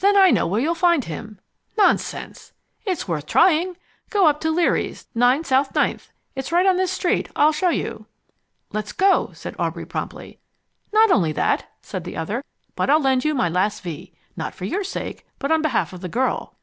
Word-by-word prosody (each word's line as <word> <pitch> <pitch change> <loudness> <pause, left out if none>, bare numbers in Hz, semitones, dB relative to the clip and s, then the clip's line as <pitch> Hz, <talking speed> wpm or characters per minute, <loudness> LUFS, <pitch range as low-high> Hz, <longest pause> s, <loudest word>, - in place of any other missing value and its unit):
"Then 400 +1 +4
I 380 -2 +7
know - - +2
where 200 +6 0
you'll 310 +7 +1
find 340 -5 +2
him." 210 +5 -7 0.4
"Nonsense!" 420 - 0 0.3
"It's 365 - -2
worth 155 -4 -3
trying. 355 0 +3 0.3
Go 405 -4 +3
up 300 -1 +3
to 320 - 0
Leary's, 335 +2 0
9 245 +6 +3
South 270 -2 +1
Ninth. - - 0 0.2
It's 265 +2 -5
right 350 +2 +3
on 380 -1 +4
this 375 -1 +1
street. 360 - 0
I'll 300 +1 +5
show 315 +4 +1
you." - - -3 0.7
"Let's 210 0 -3
go," 390 +1 +3
said - - -7
Aubrey - - -2
promptly. - - -6 0.5
"Not 435 -1 +5
only 165 - +3
that," - - 0
said - - -5
the - - -7
other, 220 - -3 0.3
"but - - 0
I'll 300 +2 +6
lend 265 -3 +2
you 305 0 +1
my 210 - +2
last 185 +4 0
V. 170 0 -7 0.2
Not 160 -3 -5
for 180 - -6
your 390 - -1
sake, 390 - -5
but 280 - -2
on 320 -1 +4
behalf 310 -10 0
of 180 - -9
the 180 - -5
girl. 255 +7 -1
290 Hz, 195 wpm, -22 LUFS, -, 0.7 s, I